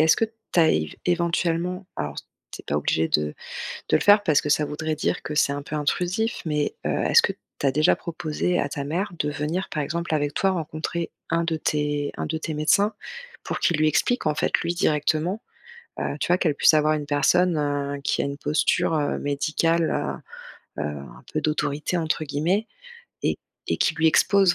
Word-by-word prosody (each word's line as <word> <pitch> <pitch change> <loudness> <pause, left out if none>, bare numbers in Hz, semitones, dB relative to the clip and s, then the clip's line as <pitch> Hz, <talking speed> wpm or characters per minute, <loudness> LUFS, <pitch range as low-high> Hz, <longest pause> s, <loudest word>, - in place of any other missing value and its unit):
est-ce 160 +1 +5
que 225 - +2
tu 220 -4 -6
as 160 - +5
év 80 -1 -1
éventuellement, 175 +1 0
alors 75 0 -4 0.3
tu - - -9
es - - -43
pas 70 - 0
obligé 80 +2 +1
de 75 -1 0 0.5
de - - +5
le - - -1
faire 205 0 +6
parce 155 -7 +3
que 150 - -4
ça 150 - +3
voudrait 155 +1 -2
dire 155 - -1
que 150 - -5
c'est 150 -2 +3
un 145 0 -4
peu 150 - -5
intrusif, 180 +9 -1
mais 150 -2 -1
heu, - - +1
est-ce - - +6
que - - +1 0.3
tu - - 0
as 135 - +3
déjà 150 +3 +4
proposé 170 +1 -2
à 145 - 0
ta 140 0 -4
mère 175 +6 -2
de 150 - 0
venir 150 +6 -2
par 150 - -1
exemple 170 +2 -2
avec 145 -1 0
toi 195 - +2
rencontrer 165 -1 -3 0.2
un 165 +1 +2
de 165 -1 0
tes 145 -1 -1
un - - -2
de 160 +1 -2
tes 160 0 -4
médecins, 200 +8 +3 0.5
pour - - -3
qu'il 170 - +2
lui 155 0 +4
explique 245 - +1
en 155 - +2
fait - - 0
lui 170 +1 -1
directement, 155 +5 +1 0.6
heu, 145 - -2
tu - - -1
vois? 180 +1 +4
Qu'elle 155 -6 +1
puisse - - +5
avoir 155 0 +3
une 150 -1 -3
personne, 170 +4 +3
heu, 145 -1 -1
qui - - +1
a - - -1
une 140 0 -4
posture, 150 +2 +1
heu, 150 -2 0
médicale, 160 +3 0 0.6
heu, - - -1
heu, - - -2
un 70 -4 -9
peu 155 - 0
d'autorité 150 +2 -1
entre 160 -1 -1
guillemets 170 +9 0 0.6
et - - 0 0.3
et - - +2
qui - - +2
lui 160 - +2
expose 190 +3 +4
155 Hz, 210 wpm, -24 LUFS, 145-170 Hz, 0.6 s, faire